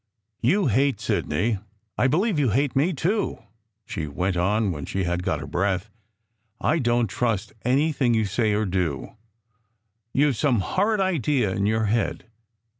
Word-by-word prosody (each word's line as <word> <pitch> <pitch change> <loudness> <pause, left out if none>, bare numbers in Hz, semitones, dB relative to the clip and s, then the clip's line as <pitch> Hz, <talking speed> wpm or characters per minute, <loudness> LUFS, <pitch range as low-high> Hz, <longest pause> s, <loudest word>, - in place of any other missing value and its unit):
"You 185 - +3
hate 135 0 +2
Sidney. 100 +8 0 0.4
I 130 - +2
believe 180 - +1
you 135 -4 +2
hate 135 +6 +1
me, 145 +7 +3
too!" 190 - -1 0.5
she 80 - -4
went 90 +6 -1
on 100 +4 +1
when 75 -4 -5
she 95 - -1
had 90 0 -1
got 80 -4 -1
her 70 - -6
breath. 95 +6 -1 0.4
" - - -53 0.3
I 160 - +1
don 120 -2 +2
t 95 - -8
trust 110 -3 -1
any 140 +6 +2
thing 125 -5 +1
you 110 -1 +2
say 105 +2 +1
or 105 +1 +1
do. 90 - -2 1.0
You 145 +2 +3
ve - - 0
some 125 -3 +1
horrid 205 - +1
idea 145 - +1
in 100 +2 0
your 110 +1 +1
head. 115 +3 -1
115 Hz, 175 wpm, -24 LUFS, 95-140 Hz, 1.0 s, You